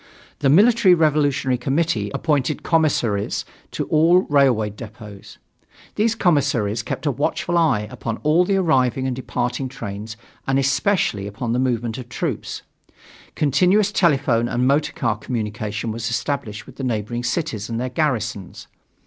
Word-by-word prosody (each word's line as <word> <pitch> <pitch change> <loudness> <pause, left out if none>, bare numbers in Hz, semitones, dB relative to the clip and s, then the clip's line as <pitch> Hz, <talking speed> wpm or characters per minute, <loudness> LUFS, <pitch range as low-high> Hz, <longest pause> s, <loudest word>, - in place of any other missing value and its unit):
The 140 - +2
Military 200 - +6
Revolutionary 145 -5 +1
Committee 135 -5 0
appointed 150 -1 0
commissaries 130 - +1 0.2
to - - -3
all 165 +4 +5
railroad 125 - +2
depots. 105 -2 -11 0.6
These 220 +2 +1
commissaries 135 - +1
kept 115 - -5
a 145 - +2
watchful 145 +5 -1
eye 135 -11 +2
upon 115 -1 -4
all 155 +4 +4
the 195 +2 +1
arriving 135 -8 +2
and 130 -1 -1
departing 125 0 -3
trains 105 -3 -7 0.3
and 135 0 +2
especially 135 - +1
upon 115 +3 -3
the 125 - 0
movements 120 -2 -1
of 125 -1 -9
troops. - - -4 0.7
Continuous 180 +9 +3
telephone 135 - +2
and 125 +1 0
motor 145 +3 +2
car 115 -5 -1
communication 110 -1 -3
was 115 +1 -3
established 115 -3 -3
with 130 - -15
the 135 - -5
neighboring 120 0 -2
cities 120 - -2
and 115 0 -3
their 130 +1 -2
garrisons. 115 - -2
130 Hz, 140 wpm, -21 LUFS, 115-155 Hz, 0.7 s, Military